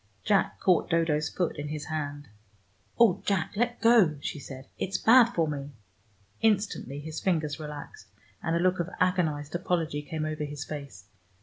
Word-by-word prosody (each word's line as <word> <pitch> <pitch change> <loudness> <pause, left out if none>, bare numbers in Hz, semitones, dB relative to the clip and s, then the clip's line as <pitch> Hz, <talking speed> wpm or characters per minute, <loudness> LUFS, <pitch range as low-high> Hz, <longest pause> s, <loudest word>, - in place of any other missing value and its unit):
Jack 200 -2 +2
caught 180 -3 +3
Dodo's 165 -3 +1
foot 175 -3 -2
in 145 - -4
his 150 -1 -5
hand. 145 -2 -4 0.7
"Oh, 205 -5 +5
Jack, 195 -3 0
let 240 +3 0
go," 225 -10 +5
she 145 - -4
said. 130 -1 -9
"It's 190 0 -1
bad 240 +4 +7
for 165 -2 +2
me." 145 -1 -5 0.7
Instantly 200 - 0
his 155 +2 -6
fingers 160 -5 0
relaxed; 150 - -8 0.3
and 165 0 0
a - - +2
look 185 +1 +2
of 175 +1 -1
agonized 160 -6 0
apology 170 -4 -1
came 155 +1 -4
over 155 0 -3
his 145 -1 -5
face. 140 -11 -8
160 Hz, 165 wpm, -28 LUFS, 145-185 Hz, 0.7 s, bad